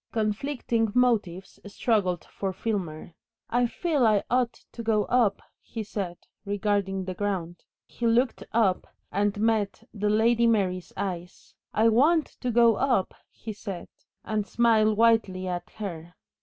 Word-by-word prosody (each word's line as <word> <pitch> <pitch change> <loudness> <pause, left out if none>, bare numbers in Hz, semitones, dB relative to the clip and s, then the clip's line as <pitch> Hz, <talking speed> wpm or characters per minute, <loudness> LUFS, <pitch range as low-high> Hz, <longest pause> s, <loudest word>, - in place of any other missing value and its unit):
Conflicting 225 0 -1
motives 210 -7 +1
struggled 200 -4 0
for 195 -1 -4
Filmer. 185 -6 -4 0.4
"I 245 +1 +3
feel 295 -2 +1
I 210 -2 +3
ought 245 -1 +2 0.2
to 235 - -7
go 220 -2 +2
up," 235 -5 +2 0.2
he 225 - -6
said, 195 -4 -4 0.3
regarding 200 -2 -1
the 185 - -4
ground. 180 -3 -3 0.2
He 235 - -3
looked 240 +2 +2
up 215 -5 +2 0.2
and 205 0 0
met 215 -2 0
the 210 0 -1
Lady 230 +2 +3
Mary's 185 -5 0
eyes. 180 -2 -5 0.2
"I 220 +1 +3
want 300 +8 +4 0.2
to 250 - -1
go 235 -2 +5
up," 245 -8 +1 0.2
he 220 - -8
said, 200 -3 -7 0.4
and 215 -1 -1
smiled 220 -2 +3
whitely 220 -5 +3
at 175 -1 -4
her. 175 -5 -7
215 Hz, 140 wpm, -27 LUFS, 195-230 Hz, 0.4 s, go